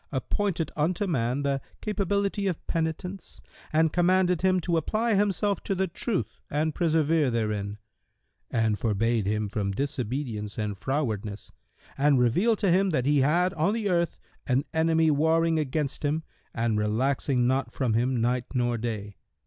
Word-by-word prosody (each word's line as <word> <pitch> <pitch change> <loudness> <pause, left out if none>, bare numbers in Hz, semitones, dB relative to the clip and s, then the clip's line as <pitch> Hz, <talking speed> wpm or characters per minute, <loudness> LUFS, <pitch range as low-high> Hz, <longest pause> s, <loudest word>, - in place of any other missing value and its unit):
appointed 165 +5 -1
unto 170 +6 0
man 130 -5 0
the 140 -1 0 0.2
capability 200 -1 -1
of 180 -4 -3
penitence 165 +3 -3 0.3
and 160 0 +2
commanded 180 -1 +3
him 185 0 +3
to 170 0 -1
apply 215 +8 +1
himself 200 -1 +1
to 195 - -2
the 190 +1 +1
Truth 195 +4 -3
and 155 +2 0
persevere 160 -3 +2
therein; 105 -3 -2 0.7
and 110 -4 +1
forbade 115 -1 +1
him 105 0 0
from 100 -1 -2
disobedience 125 -3 -3
and 105 -3 -3
frowardness 110 -7 -3 0.5
and 145 0 +4
revealed 180 - +3
to 195 -4 +2
him 190 +2 +3
that 130 -7 0
he 145 0 +3
had 175 +7 +2
on 170 +7 +1
the 215 -3 -1
earth 170 -1 +1 0.3
an 130 +1 +2
enemy 160 0 +3
warring 160 +2 +2
against 150 0 -2
him 150 +2 0 0.3
and 115 -2 0
relaxing 125 +4 +1
not 130 -1 0
from 125 -4 -1
him 120 +2 +1
night 120 +1 +1
nor 120 -2 +1
day. 105 -3 -4
145 Hz, 150 wpm, -27 LUFS, 120-175 Hz, 0.7 s, and